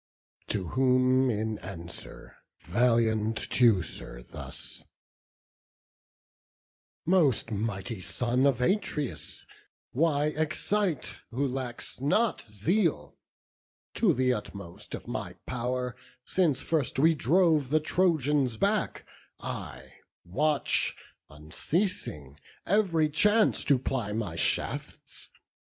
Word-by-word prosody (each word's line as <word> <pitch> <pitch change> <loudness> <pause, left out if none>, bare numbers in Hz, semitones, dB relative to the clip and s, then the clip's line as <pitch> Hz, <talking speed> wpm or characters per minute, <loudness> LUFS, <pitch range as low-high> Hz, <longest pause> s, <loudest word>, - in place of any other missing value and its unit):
To 95 -5 -2
whom 130 0 +3
in 110 -1 -1
answer 85 -2 -9 0.3
valiant 115 +1 +2
Teucer 95 - +2
thus: - - -8 2.2
"Most 155 - +3
mighty 105 -1 -3
son 125 +6 +1
of 130 -3 +1
Atreus, 150 - -1 0.5
why 150 +1 +2
excite 160 +3 -1
Who 135 +4 0
lacks 125 -3 -5
not 215 +12 +2
zeal? 155 - 0 0.8
To - - +3
th' 130 0 +2
utmost 100 -5 -6
of - - -10
my - - -4
pow'r 125 0 -2 0.3
Since 155 -8 +1
first 155 -7 0
we 160 +4 +5
drove 155 - +3
the 155 +2 +4
Trojans 150 -7 +1
back, - - 0 0.3
I - - -6 0.4
watch, 145 - +1 0.3
Unceasing, 75 - -3 0.3
every 180 -6 +3
chance 210 +9 +3
to 140 - +4
ply 125 -5 -2
my 105 -7 -3
shafts. - - -2
130 Hz, 95 wpm, -29 LUFS, 110-155 Hz, 2.2 s, we